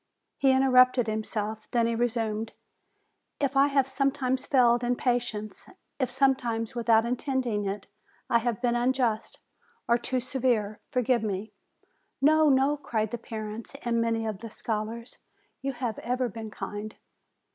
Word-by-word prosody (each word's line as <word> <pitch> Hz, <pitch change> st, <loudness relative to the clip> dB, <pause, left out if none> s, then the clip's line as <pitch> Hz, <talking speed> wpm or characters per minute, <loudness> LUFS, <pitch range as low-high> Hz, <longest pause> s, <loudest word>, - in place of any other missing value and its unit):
He 275 Hz, -, +4 dB
interrupted 255 Hz, -2 st, +5 dB
himself, 215 Hz, 0 st, -3 dB
then 235 Hz, -1 st, +2 dB
he 230 Hz, -, +1 dB
resumed: 225 Hz, -2 st, -1 dB, 0.9 s
"If 280 Hz, -1 st, 0 dB
I 275 Hz, +1 st, +6 dB
have 275 Hz, -2 st, +2 dB
sometimes 270 Hz, -1 st, 0 dB
failed 240 Hz, -3 st, +4 dB
in 245 Hz, +1 st, +1 dB
patience, 240 Hz, -5 st, -2 dB, 0.3 s
if 260 Hz, -3 st, +1 dB
sometimes, 250 Hz, -4 st, +1 dB
with 235 Hz, -1 st, -4 dB
out 225 Hz, 0 st, +6 dB
intending 245 Hz, -4 st, -1 dB
it, 195 Hz, +1 st, -3 dB, 0.4 s
I 235 Hz, -, +3 dB
have 240 Hz, 0 st, -2 dB
been 240 Hz, -1 st, +2 dB
unjust, 240 Hz, -2 st, 0 dB, 0.5 s
or 235 Hz, +1 st, +3 dB
too 255 Hz, +1 st, -1 dB
severe, 240 Hz, -5 st, 0 dB
forgive 250 Hz, -3 st, +1 dB
me." 210 Hz, 0 st, -3 dB, 0.7 s
"No, 310 Hz, +2 st, +5 dB
no!" 275 Hz, +2 st, +3 dB
cried 220 Hz, -6 st, -2 dB
the 240 Hz, -, -4 dB
parents 220 Hz, +2 st, -6 dB
and 235 Hz, -1 st, +1 dB
many 230 Hz, -1 st, 0 dB
of 215 Hz, -3 st, -3 dB
the 230 Hz, +1 st, -7 dB
scholars, 225 Hz, +2 st, -5 dB, 0.4 s
"You 275 Hz, 0 st, -2 dB
have 240 Hz, -3 st, -3 dB
ever 250 Hz, +1 st, -1 dB
been 220 Hz, +1 st, -7 dB
kind!" 210 Hz, +1 st, -6 dB
240 Hz, 145 wpm, -28 LUFS, 220-260 Hz, 0.9 s, I